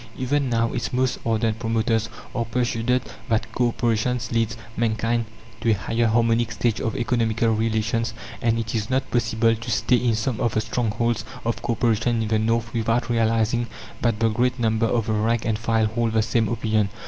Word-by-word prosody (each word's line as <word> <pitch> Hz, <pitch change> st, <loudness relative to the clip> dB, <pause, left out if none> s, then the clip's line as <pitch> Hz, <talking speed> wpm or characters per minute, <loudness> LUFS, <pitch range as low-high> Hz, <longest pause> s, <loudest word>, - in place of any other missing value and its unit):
Even 135 Hz, +1 st, 0 dB
now, 115 Hz, -1 st, +1 dB
its 120 Hz, -, -2 dB
most 130 Hz, 0 st, 0 dB
ardent 115 Hz, -1 st, 0 dB
promoters 115 Hz, 0 st, 0 dB, 0.2 s
are 120 Hz, -, 0 dB
persuaded 120 Hz, +1 st, 0 dB, 0.3 s
that 115 Hz, 0 st, 0 dB
co 120 Hz, +1 st, +1 dB
operation 120 Hz, +1 st, 0 dB
leads 115 Hz, 0 st, 0 dB, 0.2 s
mankind 115 Hz, 0 st, 0 dB, 0.3 s
to 115 Hz, -, 0 dB
a -, -, +6 dB
higher 115 Hz, +4 st, 0 dB
harmonic 115 Hz, +1 st, +2 dB
stage 115 Hz, -1 st, 0 dB
of 110 Hz, -, -2 dB
economical 115 Hz, -2 st, +1 dB
relations, 110 Hz, 0 st, 0 dB, 0.3 s
and 115 Hz, -1 st, +2 dB
it 115 Hz, -1 st, -3 dB
is 110 Hz, -2 st, -2 dB
not 130 Hz, +1 st, 0 dB
possible 115 Hz, -1 st, +2 dB
to 115 Hz, +2 st, -7 dB
stay 120 Hz, +3 st, +3 dB
in 120 Hz, -2 st, +1 dB
some 110 Hz, +1 st, -1 dB
of 120 Hz, -3 st, 0 dB
the 110 Hz, -, +3 dB
strongholds 115 Hz, 0 st, -1 dB, 0.2 s
of 115 Hz, -, -1 dB
co 120 Hz, -, 0 dB
operation 115 Hz, 0 st, +1 dB
in 110 Hz, -, -3 dB
the 110 Hz, -1 st, +2 dB
North 115 Hz, +1 st, 0 dB
without 115 Hz, +1 st, 0 dB
realizing 115 Hz, +1 st, +1 dB, 0.3 s
that 115 Hz, -3 st, +1 dB
the 115 Hz, 0 st, +3 dB
great 125 Hz, +3 st, +1 dB
number 115 Hz, -1 st, +1 dB
of 115 Hz, -2 st, 0 dB
the 110 Hz, -, 0 dB
rank 110 Hz, +2 st, +1 dB
and 110 Hz, -2 st, 0 dB
file 115 Hz, -1 st, +2 dB
hold 115 Hz, +1 st, 0 dB
the 110 Hz, -1 st, +3 dB
same 110 Hz, -1 st, +1 dB
opinion. 110 Hz, -3 st, +1 dB
115 Hz, 190 wpm, -23 LUFS, 110-120 Hz, 0.3 s, a